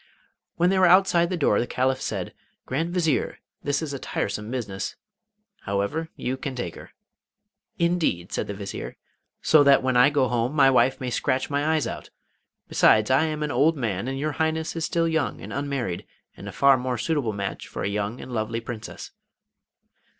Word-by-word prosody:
When 175 +2 +3
they 190 - +2
were 185 - +6
outside 175 -1 +5
the 180 - -2
door 140 -10 +3
the 120 - -1
Caliph 130 +1 0
said: - - -4 0.3
'Grand 160 +6 -2
Vizier, 160 -8 0 0.2
this 145 +2 -1
is 145 -3 -4
a 140 - -4
tiresome 105 -1 -3
business. 105 -6 -4 0.7
However, 100 +12 -1
you 130 +1 -3
can 135 -1 -5
take 105 -9 -4
her.' - - -12 0.9
'Indeed!' 170 - 0
said - - -2
the 100 - -5
Vizier; 100 0 -6 0.5
'so 155 - +6
that 140 -2 +5
when 130 -1 +1
I 125 +3 +6
go 140 -3 +2
home 120 +3 -1
my 135 -2 +6
wife 130 0 +3
may 125 -2 -3
scratch 130 +2 -1
my 145 +3 +1
eyes 155 - 0
out! - - -6 0.6
Besides, 110 +2 +4
I 135 +5 +4
am 155 -1 -2
an 150 - -2
old 160 +2 +3
man, 110 -4 -2
and 135 0 -3
your 150 +3 -1
Highness 160 +2 -1
is 165 -1 -1
still 170 -2 +1
young 160 -2 -1
and - - -8
unmarried, 140 -10 -3 0.3
and - - -8
a - - -7
far 140 -1 +5
more 125 -1 -2
suitable 145 -3 0
match 100 -1 -5
for - - -5
a - - 0
young 105 +3 -2
and - - -9
lovely 115 0 -2
Princess. 115 -1 -8
135 Hz, 190 wpm, -25 LUFS, 115-160 Hz, 0.9 s, were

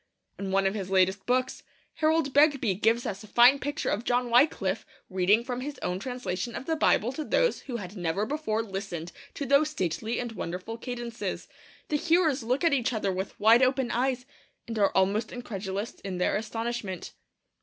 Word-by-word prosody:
In 195 -1 -3
one 195 0 +2
of 195 - +2
his 195 -3 -4
latest 190 0 +2
books, 255 +1 0 0.4
Harold 310 -3 +2
Begbie 285 -7 +4
gives 225 +5 +1
us 200 +1 -4
a - - -12
fine 245 +6 +6
picture 290 +4 -2
of 215 - -1
John 245 0 0
Wyclif 235 -7 +3 0.3
reading 190 +5 +3
from 250 0 -4
his 290 +2 -5
own 180 +1 -1
translation 240 -2 -4
of - - -5
the 320 - 0
Bible 245 -6 +2
to 305 +4 -4
those - - +1
who 250 - -7
had 195 -2 -8
never 180 +2 -1
before 245 -5 -1
listened 190 -5 -5 0.2
to 285 - -3
those 280 +3 +4
stately 190 - -2
and 240 -1 -3
wonderful 185 +1 -5
cadences. 240 -1 -5 0.4
The 300 - +2
hearers 320 -3 +2
look 250 +6 -1
at 335 - +4
each 255 -2 +1
other 210 -3 0
with 190 +1 -5
wide 225 +3 +6
open 260 -1 +2
eyes, 250 +1 0 0.4
and 225 -2 -3
are 200 - +4
almost 200 +4 +2
incredulous 200 -3 -4
in 190 -2 -5
their 180 - +1
astonishment. 225 -3 -4
230 Hz, 185 wpm, -28 LUFS, 195-260 Hz, 0.4 s, fine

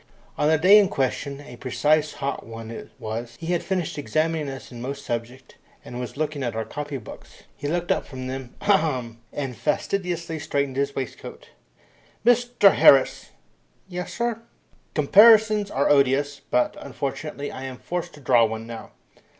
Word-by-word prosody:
On 150 - +2
the 160 - +4
day 190 +6 +7
in 200 - +4
question 140 +1 -2
a 125 -4 -11
precious 150 +4 +1
hot 140 0 -3
one 115 0 -9
it 115 - -8
was 115 +2 -6
he 170 +2 -2
had 175 - 0
finished 180 -6 -2
examining 155 0 -1
us 135 -1 -9
in 120 -1 -9
most 140 +3 -5
subjects, 120 +2 -5 0.3
and 120 - -7
was 125 +2 -6
looking 150 -1 -2
at 120 -3 -2
our 110 0 -2
copy 145 -1 -5
books. 115 - -12
He 145 - -5
looked 175 +2 -1
up - - 0
from 130 -2 -7
them, 130 -1 -6
ahemed! 135 - +1
and 135 -4 -4
fastidiously 170 +1 -2
straightened 140 -3 -1
his 140 0 -1
waistcoat. 130 -2 -7 0.8
"Mr 245 -4 +5
Harris! 135 -1 +5 0.6
"Yes, 180 -1 -5
sir." 235 -1 -1 0.5
"Comparisons 210 +6 +6
are 140 -5 +1
odious, 140 0 +2
but, 125 - +1
unfortunately, 140 +1 -5
I 130 - -7
am 130 -1 -6
forced 175 +3 -4
to - - -14
draw 120 -3 +4
one 110 0 -4
now." 115 -1 -9
140 Hz, 165 wpm, -24 LUFS, 130-170 Hz, 0.8 s, day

